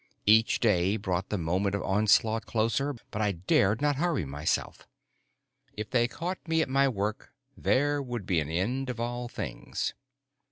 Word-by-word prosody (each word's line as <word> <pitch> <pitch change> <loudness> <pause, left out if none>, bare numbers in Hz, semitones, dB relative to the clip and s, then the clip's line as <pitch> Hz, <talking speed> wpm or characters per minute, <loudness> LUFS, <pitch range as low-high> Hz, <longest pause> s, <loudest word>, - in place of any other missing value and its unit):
Each 110 +2 +5
day 100 -2 +2
brought 95 -2 -2
the 105 - -1
moment 95 +4 0
of 100 - -3
onslaught 110 +3 +2
closer, 115 +6 0 0.2
but 105 - -3
I 105 -2 +1
dared 95 +5 +2
not 145 -2 +2
hurry 160 - 0
myself. 70 +2 -2 0.9
If 105 0 -6
they 120 -2 +3
caught 180 +8 -4
me 160 0 +2
at - - -6
my 135 +1 +3
work, 105 -2 -3 0.2
there 145 +2 +1
would 120 -6 -5
be 90 -3 +1
an 75 -1 -3
end 120 +11 -1
of 120 -2 -4
all 120 +1 -3
things. - - -4
110 Hz, 165 wpm, -28 LUFS, 95-130 Hz, 0.9 s, Each